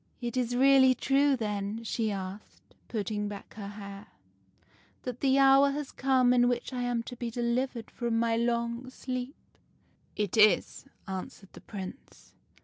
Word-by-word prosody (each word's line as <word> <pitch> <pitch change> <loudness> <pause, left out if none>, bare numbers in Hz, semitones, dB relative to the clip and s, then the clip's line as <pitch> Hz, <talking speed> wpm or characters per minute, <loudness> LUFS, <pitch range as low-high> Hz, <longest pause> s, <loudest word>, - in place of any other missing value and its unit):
It 240 0 -4
is 245 -1 0
really 260 0 +6
true, 275 +2 +3
then,' 210 0 -3
she 225 0 -1
asked, 195 +1 -8
putting 210 -1 -2
back 205 -1 -8
her 205 -2 -7
hair, 200 -1 -9 0.5
' - - -34
that 250 -1 -5
the 270 -1 +3
hour 275 +1 +6
has 285 0 -4
come 260 -2 +3
in 245 0 +4
which 245 +1 -2
I 250 - -2
am 245 -1 -1
to 245 - -8
be 240 0 -4
delivered 235 0 -2
from 235 -2 -1
my 230 0 +2
long 235 +1 -1
sleep? 255 +1 -5 0.3
' - - -38
" - - -37
' - - -36
It 210 0 -2
is,' 210 -4 +4 0.2
answered 190 +1 -7
the - - -12
Prince. 195 +5 -10
235 Hz, 170 wpm, -29 LUFS, 210-255 Hz, 0.5 s, really